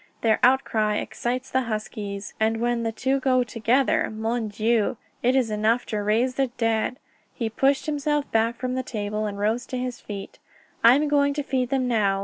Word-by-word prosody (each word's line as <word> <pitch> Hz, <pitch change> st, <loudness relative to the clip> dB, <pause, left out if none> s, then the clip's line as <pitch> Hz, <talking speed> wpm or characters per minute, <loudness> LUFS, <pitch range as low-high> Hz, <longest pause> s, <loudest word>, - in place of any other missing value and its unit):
"Their 220 Hz, -1 st, +3 dB
outcry 225 Hz, -5 st, +3 dB
excites 250 Hz, +4 st, -3 dB
the 260 Hz, -, +2 dB
huskies, 210 Hz, -2 st, -5 dB
and 220 Hz, +1 st, +1 dB
when 240 Hz, 0 st, 0 dB
the 225 Hz, -1 st, -1 dB
two 265 Hz, +4 st, 0 dB
go 255 Hz, -1 st, +2 dB
together 245 Hz, +3 st, +1 dB
Mon 220 Hz, +1 st, -2 dB
Dieu! 220 Hz, +2 st, +1 dB, 0.2 s
it 250 Hz, +2 st, +2 dB
is 250 Hz, -5 st, +2 dB
enough 220 Hz, +3 st, +1 dB
to 210 Hz, -, -3 dB
raise 225 Hz, +5 st, +1 dB
the 270 Hz, -1 st, +2 dB
dead." 225 Hz, +1 st, 0 dB, 0.4 s
He 230 Hz, -4 st, -2 dB
pushed 270 Hz, +4 st, +2 dB
himself 295 Hz, -1 st, 0 dB
back 225 Hz, +1 st, +2 dB
from 255 Hz, +1 st, -3 dB
the 260 Hz, -, -1 dB
table 215 Hz, -3 st, -3 dB
and 200 Hz, -1 st, -5 dB
rose 220 Hz, +4 st, 0 dB
to 255 Hz, -, -4 dB
his 250 Hz, -1 st, -4 dB
feet. 200 Hz, -2 st, -8 dB, 0.4 s
"I 235 Hz, +2 st, +8 dB
am 295 Hz, +2 st, +1 dB
going 285 Hz, -1 st, +2 dB
to 295 Hz, -, -1 dB
feed 255 Hz, -3 st, -1 dB
them 260 Hz, -1 st, 0 dB
now. 205 Hz, -5 st, +2 dB
235 Hz, 190 wpm, -25 LUFS, 215-260 Hz, 0.4 s, I